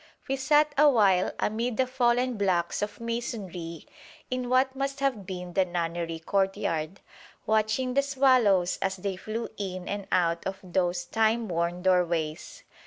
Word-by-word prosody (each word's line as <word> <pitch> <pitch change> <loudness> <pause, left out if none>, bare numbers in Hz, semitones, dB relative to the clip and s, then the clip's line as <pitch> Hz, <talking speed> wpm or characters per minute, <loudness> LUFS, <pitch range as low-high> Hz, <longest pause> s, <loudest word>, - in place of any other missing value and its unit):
We 270 - 0
sat 295 +2 +3
awhile 210 -11 +5
amid 225 +2 -1
the 260 - +3
fallen 250 -1 +1
blocks 185 -4 0
of 205 0 -4
masonry 195 -8 -5 0.5
in 255 -1 -2
what 260 +1 +2
must 275 +1 -3
have 255 -9 -1
been 180 -2 -6
the 190 - +3
nunnery 170 -2 -3
courtyard, 180 -1 -1 0.4
watching 220 +4 +1
the 280 - +4
swallows 255 -10 +3
as 190 0 0
they 190 +1 -3
flew 220 +5 -5
in 185 -3 -5
and 200 -1 -4
out 170 -1 +1
of 190 0 -4
those 180 -1 -1
timeworn 180 -5 0
doorways. 170 -4 0
200 Hz, 140 wpm, -27 LUFS, 180-250 Hz, 0.5 s, awhile